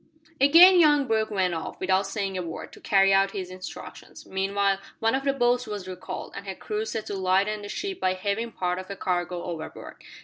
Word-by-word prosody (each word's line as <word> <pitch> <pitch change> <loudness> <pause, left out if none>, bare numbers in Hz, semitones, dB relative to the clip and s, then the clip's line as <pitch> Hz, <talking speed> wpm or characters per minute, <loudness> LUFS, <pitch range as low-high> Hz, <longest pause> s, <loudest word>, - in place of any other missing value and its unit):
Again 340 +7 +8
young 295 -3 +5
Brooke 220 -2 0
went 190 -4 0
off, 165 - -5
without 190 +1 +1
saying 195 -1 -3
a 185 - -2
word, 165 -2 -7
to - - -13
carry 195 -1 +4
out 195 0 +3
his 185 -1 -5
instructions. 185 0 -10
Meanwhile 195 0 0 0.2
one 225 0 +1
of 270 +1 -1
the 275 - +3
boats 245 -2 +1
was 205 -3 -6
recalled, 185 -1 -7
and 200 - -8
her 190 - -4
crew 215 +3 -4
set 220 0 -4
to - - -5
lighten 195 +3 +1
the 205 - -8
ship 390 - -4
by 185 0 +1
heaving 205 +5 -2
part 180 -2 -2
of 185 - -8
the 200 - -6
cargo 180 -2 -2
overboard. 165 -3 -7
195 Hz, 210 wpm, -26 LUFS, 185-225 Hz, 0.2 s, Again